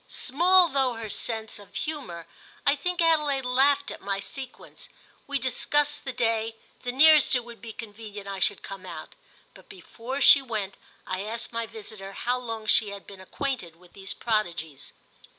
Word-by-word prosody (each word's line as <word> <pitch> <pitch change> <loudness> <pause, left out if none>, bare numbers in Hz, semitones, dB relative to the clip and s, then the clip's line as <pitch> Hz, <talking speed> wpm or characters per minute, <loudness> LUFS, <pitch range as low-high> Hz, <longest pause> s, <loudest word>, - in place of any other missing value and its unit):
Small 355 +6 +4
though 265 -3 +1
her 225 -2 -5
sense 220 -2 -2
of 200 -1 -15
humour, 195 - -4 0.4
I 280 - +5
think 350 +4 0
Adelaide 300 -5 +3
laughed 275 +3 +3
at - - -8
my 195 0 -1
sequence. 255 +6 -9 0.4
We 285 0 0
discussed 290 +3 +1
the 265 - -2
day, 225 -2 0 0.3
the 245 - -2
nearest 300 +2 +7
it 245 -2 0
would 235 -3 -11
be 230 0 -7
convenient 210 -2 -9
I 195 -1 -4
should 200 +1 0
come 195 -1 -8
out; - - -8 0.4
but - - -17
before 265 - -6
she 280 0 +8
went 215 -6 -3 0.3
I 185 0 -2
asked 230 +3 -4
my 230 0 -2
visitor 210 -3 -9
how 245 +5 -1
long 225 -3 -5
she 215 0 +3
had 200 -1 -8
been 195 -2 -11
acquainted 220 - -4
with 180 +1 -21
these 195 0 -7
prodigies. 170 - -2
230 Hz, 170 wpm, -27 LUFS, 200-275 Hz, 0.4 s, she